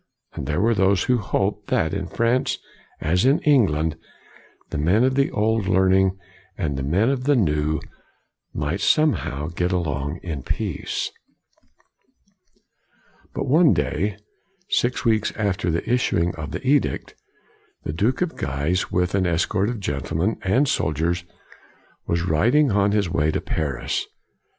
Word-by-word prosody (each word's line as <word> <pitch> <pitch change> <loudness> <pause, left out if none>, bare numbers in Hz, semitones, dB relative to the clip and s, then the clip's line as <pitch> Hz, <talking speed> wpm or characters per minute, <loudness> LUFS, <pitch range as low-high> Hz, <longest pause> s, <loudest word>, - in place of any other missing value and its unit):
And 65 - -6
there 75 +3 0
were 115 +4 +3
those 95 -1 +2
who 125 -1 +2
hoped, 100 +1 -1
that 80 -1 +1
in 95 -3 -3
France 120 +6 0 0.4
as 90 +4 +1
in 135 +4 +4
England, 80 - +2 0.7
the - - -2
men 90 +10 +3
of 130 +1 +3
the 140 +1 +2
old 110 -1 0
learning 95 0 +3 0.4
and 75 -4 -2
the 70 - -3
men 90 - +2
of 130 -2 -1
the 145 0 +4
new, 75 - +1 0.7
might 75 +6 -2
somehow 90 - +1
get 90 +1 -1
along 75 -3 -2
in 80 -6 -4
peace. - - -3 2.2
But - - -2
one 155 +4 +5
day, 100 +5 -1 0.5
six 125 +1 +1
weeks 110 -2 +2
after 100 -4 -1
the 85 +1 -2
issuing 90 -8 +1
of 75 -3 -6
the 70 - -6
edict, 145 0 +1 0.7
the 75 - -4
Duke 115 - +1
of 175 - -4
Guise, 70 +7 -1
with 90 0 0
an 95 -2 +2
escort 90 +4 +1
of 120 -2 -4
gentlemen 80 +4 -2
and 125 +10 +2
soldiers, 85 - 0 0.8
was 85 0 0
rid 90 - +2
ing 150 -4 +4
on 100 0 +2
his 105 -2 +1
way 75 0 +1
to - - 0
Paris. 70 -6 -2
95 Hz, 145 wpm, -23 LUFS, 80-115 Hz, 2.2 s, one